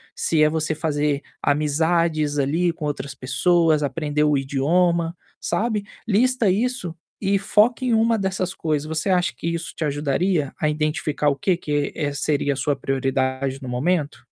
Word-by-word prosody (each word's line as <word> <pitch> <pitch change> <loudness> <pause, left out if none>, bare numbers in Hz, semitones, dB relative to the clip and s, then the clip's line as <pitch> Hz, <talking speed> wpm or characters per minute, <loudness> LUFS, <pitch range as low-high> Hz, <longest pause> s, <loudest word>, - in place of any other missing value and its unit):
se 160 -2 +2
é 155 - +5
você 160 0 0
fazer 150 -2 0 0.2
amizades 155 0 +1
ali 165 +5 +1
com 155 - -6
outras 140 -2 -4
pessoas, 155 +4 +2
aprender 150 +1 -1
o 150 -1 +3
idioma, 165 +5 +1 0.2
sabe. 210 +3 -1 0.2
Lista 235 0 +3
isso 215 -3 0 0.3
e 200 0 +2
foca 220 +6 +2
em 240 - +2
uma 225 0 +3
dessas 190 -1 -2
coisas. 150 -2 -1
Você 160 +4 -1
acha 180 -1 +2
que 170 - -5
isso 170 0 -3
te 160 - -2
ajudaria 145 +2 0
a 155 - +1
identificar 150 -1 0
o 140 - 0
que 180 +6 +1
que 145 -3 -2 0.2
seria 145 0 +1
a - - -6
sua 145 +1 0
prioridade 135 0 -1
no 130 - -6
momento? 140 -2 -1
155 Hz, 160 wpm, -22 LUFS, 145-180 Hz, 0.3 s, é